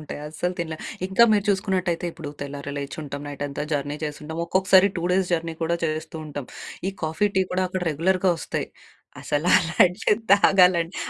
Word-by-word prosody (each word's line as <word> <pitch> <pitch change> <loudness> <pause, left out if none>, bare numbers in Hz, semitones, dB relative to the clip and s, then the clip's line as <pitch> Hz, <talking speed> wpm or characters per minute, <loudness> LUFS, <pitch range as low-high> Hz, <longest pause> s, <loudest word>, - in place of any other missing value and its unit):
ఉంటాయి. 150 - -7
అస్సలు 180 +4 -3
తినలేం. 160 -2 -4 0.3
ఇంకా 190 +5 +4
మీరు 205 -2 +2
చూసుకున్నట్టయితే 185 -3 0
ఇప్పుడు 155 -4 -8
తెల్లారి 140 0 -6
లేచుంటాం, 140 0 -6
నైట్ 145 0 -6
అంతా 140 - -5
జర్నీ 145 0 -1
చేసుంటాం. 150 +1 -6
ఒక్కొక్కసారి 190 +2 +4
2 - - -4
డేస్ 190 0 +2
జర్నీ 165 -1 -1
కూడా 170 +1 +1
చేస్తూ 155 0 -3
ఉంటాం. 145 -3 -6 0.4
ఈ - - -3
కాఫీ, 160 +6 +1
టీ 190 - +5
గూడా 185 +1 0
అక్కడ 185 0 -3
రెగ్యులర్‌గా 185 +4 +2
వస్తాయి. - - -4 0.5
అసలు 150 +4 -1
అలాంటివి 180 +4 +3 0.2
తాగాలంటే 180 -3 +4
170 Hz, 160 wpm, -24 LUFS, 150-185 Hz, 0.5 s, టీ